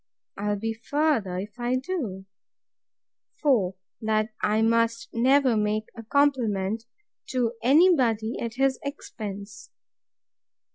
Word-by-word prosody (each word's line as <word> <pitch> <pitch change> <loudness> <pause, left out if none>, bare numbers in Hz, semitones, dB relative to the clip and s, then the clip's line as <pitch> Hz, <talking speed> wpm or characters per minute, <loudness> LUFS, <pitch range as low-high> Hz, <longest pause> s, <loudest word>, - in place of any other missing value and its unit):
I'll 205 +1 -1
be 225 +2 -2
further 240 -6 0
if 205 +5 -7
I 240 +1 0
do. 255 - -3 1.2
4. 215 -11 +3 0.3
That 215 0 +1
I 215 +1 +2
must 230 0 +1
never 260 +1 +4
make 215 0 0
a 230 - -7
compliment 225 -5 +1 0.4
to 245 -3 0
any 320 +9 +6
body 230 -4 0
at 230 -1 -4
his 270 0 +1
expense. 215 -6 -7
230 Hz, 110 wpm, -26 LUFS, 210-260 Hz, 1.2 s, any